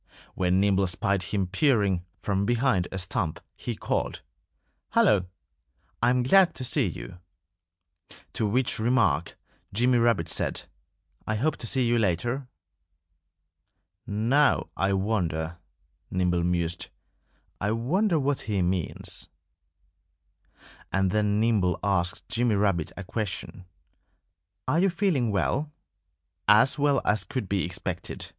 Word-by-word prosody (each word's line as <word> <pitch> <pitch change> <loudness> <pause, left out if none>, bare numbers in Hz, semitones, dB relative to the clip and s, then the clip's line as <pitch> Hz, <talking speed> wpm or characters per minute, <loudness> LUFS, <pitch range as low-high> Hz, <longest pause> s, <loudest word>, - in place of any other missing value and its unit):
When 90 0 +1
Nimble 100 -1 +3
spied 100 +1 0
him 95 +2 -1
peering 100 - +2 0.2
from 100 -1 0
behind 115 -5 +1
a 95 - -4
stump 90 -3 -2 0.2
he - - -5
called, - - -2 0.7
"Hullo! 95 -4 +4 0.7
I'm 125 +1 +3
glad 190 +7 +5
to 130 - -5
see 125 - +1
you." - - -8 1.1
To 110 - 0
which 125 +3 0
remark 110 - +1 0.3
Jimmy 120 +4 +3
Rabbit 115 -9 +2
said, - - -1 0.6
"I 110 - 0
hope 150 +9 0
to 115 - -5
see 130 +2 +1
you 120 0 +2
later." 120 +7 -1 1.6
"Now, 120 +8 +2
I 95 0 +1
wonder 85 -5 -1 0.3
" - - -45
Nimble 90 -1 +1
mused 85 -1 -1 0.7
"I 105 - -1
wonder 165 - +1
what 140 -1 0
he 100 -3 +1
means." 90 -1 -2 1.6
And 95 -1 +1
then 105 0 +1
Nimble 105 -6 +2
asked 90 -3 0
Jimmy 120 -2 +1
Rabbit 100 -5 +1
a 95 - -5
question: 95 -2 -5 1.0
"Are 150 +6 +2
you 195 +2 +4
feeling 170 - +1
well?" 135 +9 0 0.8
"As 110 +7 +5
well 140 -2 +3
as 105 -2 +2
could 130 -6 -4
be 95 -1 0
expected!" 85 0 -5
105 Hz, 125 wpm, -27 LUFS, 90-125 Hz, 1.6 s, glad